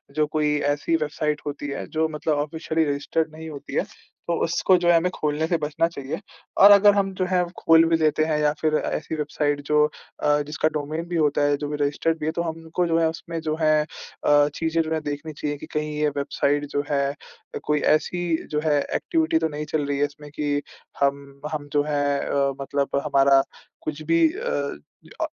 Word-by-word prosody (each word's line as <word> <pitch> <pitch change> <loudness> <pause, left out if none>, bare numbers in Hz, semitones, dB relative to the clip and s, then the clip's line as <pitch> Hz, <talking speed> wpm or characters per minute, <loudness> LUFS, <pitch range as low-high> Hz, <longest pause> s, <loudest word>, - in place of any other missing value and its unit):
जो 155 0 +3
कोई 150 -1 +2 0.2
ऐसी 145 +3 0
वेबसाइट 150 -1 -1
होती 145 0 -4
है 140 - -4
जो 160 0 0
मतलब 155 0 -1
ऑफ़िशियली 160 +2 -1
रज़िस्टर्ड 150 +3 -1
नहीं 160 0 -8
होती 145 -3 -8
है - - +1 0.4
तो 170 - +1
उसको 175 +3 +3
जो 175 0 -1
है 175 - +6
हमें 175 +2 +1
खोलने 150 +1 -1
से 170 - +1
बचना 150 +2 +1
चाहिए। 140 -5 -6 0.4
और 200 +1 +9
अगर 205 0 +7
हम 195 -1 0
जो 185 - 0
है 180 -1 +3
खोल 165 0 +6
भी 165 0 +3
देते 155 -1 +2
हैं 155 -1 0
या 150 0 +3
फ़िर 155 -1 +2
ऐसी 155 +1 -3
वेबसाइट 145 -1 -1
जो 150 0 +4 0.4
अ, 150 0 +3
जिसका 150 +1 0
डोमेन 155 +2 -3
भी 175 - -4
होता 150 -3 +2
है, 145 0 +2
जो 145 - -4
भी 150 - -2
रज़िस्टर्ड 150 +3 0
भी - - -3
है 160 - +1
तो 170 - -2
हमको 165 +1 -2
जो 165 0 +2
है 165 - +3
उसमें 165 +1 -6
जो 155 -1 -1
है 155 -1 +4
अ, 145 -1 +1
चीज़ें 165 0 0
जो 160 0 -4
है 160 - 0
देखनी 150 +1 -5
चाहिए 145 0 -3
कि - - -9
कहीं 150 0 -1
ये 150 0 +2
वेबसाइट 145 +1 0
जो 145 - 0
है 140 -1 +2
अ, 140 - -12
कोई 150 0 +1 0.2
ऐसी 175 +3 -2 0.3
जो 150 - +1
है 150 -2 +3 0.2
एक्टिविटी 325 - +1
तो 160 - +1
नहीं 150 0 -5
चल 150 -1 -1
रही 140 0 -1
है 145 - +3
इसमें 145 0 -10
कि 145 -1 0 0.4
हम 140 0 +1 0.3
हम 145 -1 -4
जो 145 -1 +3
है 145 -1 0
अ, 140 -1 0
मतलब 140 0 -1
हमारा 140 -1 +5 0.4
कुछ 155 0 -5
भी 165 0 +4
अ 140 0 -3 0.4
अ, - - +2
150 Hz, 215 wpm, -24 LUFS, 145-160 Hz, 0.4 s, और